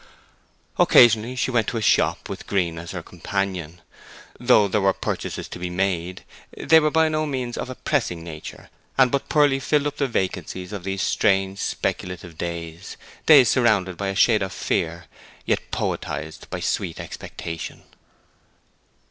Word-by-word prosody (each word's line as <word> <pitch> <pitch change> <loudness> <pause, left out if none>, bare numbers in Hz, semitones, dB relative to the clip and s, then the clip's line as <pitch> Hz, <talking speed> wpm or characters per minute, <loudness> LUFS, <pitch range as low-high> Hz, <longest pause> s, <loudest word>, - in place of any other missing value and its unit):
Occasionally 115 +1 +6
she 130 +1 -1
went 120 -4 +1
to 115 - -2
a - - -2
shop, - - +2
with - - -7
Green 85 -5 0
as 85 0 -8
her - - -5
companion. 90 -4 -4 0.6
Though 120 -4 +5
there 105 +2 0
were 95 0 +3
purchases - - -4
to - - -8
be 90 0 -3
made, 90 -1 -2 0.3
they 160 - +5
were 155 -1 +2
by 160 +1 +3
no 155 0 -1
means 130 -4 -3
of - - -5
a 130 - -6
pressing 110 - -1
nature, 80 -2 -9 0.3
and 130 -2 +5
but 140 0 -1
poorly 145 -3 +3
filled 145 +2 +1
up 145 0 -3
the 140 - +1
vacancies 95 -3 -3
of 95 -3 -6
those 95 0 -2
strange, 95 -2 +1
speculative 90 -2 -3
days, 85 +1 -6 0.3
days 140 -7 +8
surrounded 105 -7 +2
by 100 +3 -3
a 95 - -2
shade 110 +2 +4
of 95 0 -3
fear, 85 +1 -2 0.4
yet - - -1
poetized - - -4
by - - -5
sweet 80 - -2
expectation. 80 -2 -7
100 Hz, 160 wpm, -23 LUFS, 90-125 Hz, 0.6 s, days